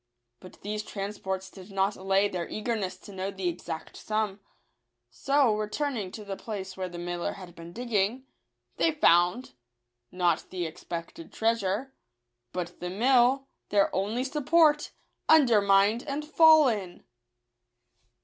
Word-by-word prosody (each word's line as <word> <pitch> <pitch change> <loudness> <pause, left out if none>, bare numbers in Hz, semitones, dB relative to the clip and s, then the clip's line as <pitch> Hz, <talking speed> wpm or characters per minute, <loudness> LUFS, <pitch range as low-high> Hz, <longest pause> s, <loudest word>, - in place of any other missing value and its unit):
But 185 - -14
these 210 +1 -3
transports 195 -2 -5
did 190 0 -12
not 195 +1 +1
allay 195 +1 +2
their 180 -4 -4
eagerness 210 -4 -3
to 200 - -13
know 190 +1 -3
the 190 -2 -4
exact 165 -2 -5
sum; 215 -2 -2 0.7
so, 275 -6 +2
returning 215 0 -2
to 215 - -8
the 195 -1 -4
place 190 -3 -6
where 185 -1 -4
the 175 - -9
miller 175 0 -3
had 185 -3 -11
been 170 0 -11
digging, 235 +3 -1 0.5
they 325 - +2
found 180 - +3 0.3
— - - -55 0.3
not 180 -1 +1
the 180 -2 -3
expected 165 +1 -7
treasure, 225 +3 -1 0.6
but 175 -1 -5
the 180 - -4
mill, 250 +6 +3 0.2
their 200 -1 +2
only 210 +6 -1
support, 300 +2 +3 0.4
undermined 215 -6 +5
and 290 +2 -3
fallen 300 - +4
200 Hz, 130 wpm, -28 LUFS, 185-245 Hz, 0.7 s, undermined